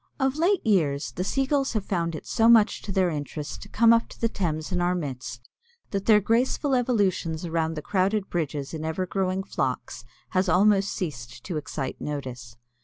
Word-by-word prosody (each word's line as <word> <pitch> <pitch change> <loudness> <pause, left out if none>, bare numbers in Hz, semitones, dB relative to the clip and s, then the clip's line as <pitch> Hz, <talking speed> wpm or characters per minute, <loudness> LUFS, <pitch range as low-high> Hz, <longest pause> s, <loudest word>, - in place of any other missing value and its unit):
Of 270 0 +1
late 345 +4 +2
years 150 - +1
the 180 - -3
Sea 270 +7 0
Gulls 275 -1 0
have 215 -3 -1
found 170 -3 -1
it - - -8
so 225 0 +3
much 225 -2 +5
to 200 - -6
their 185 -2 +2
interest 150 0 -5
to 205 - -10
come 230 +2 +5
up 230 0 +2
to - - -13
the 230 - +2
Thames 155 -6 -2
in 180 -1 0
our 175 +1 +2
midst 130 -6 -6 0.4
that 195 -1 -3
their 215 -2 +7
graceful 245 +6 +1
evolutions 200 -10 +1
around 165 -1 -1
the 150 - -5
crowded 195 +1 +1
bridges 150 -4 -3
in 155 -1 -4
ever 160 +4 -2
growing 190 0 -1
flocks 125 - -3 0.3
has 185 0 +1
almost 195 +2 +4
ceased 120 -9 -5
to 180 - -5
excite 140 -3 -5
notice. 130 -5 -5
180 Hz, 190 wpm, -26 LUFS, 150-210 Hz, 0.4 s, their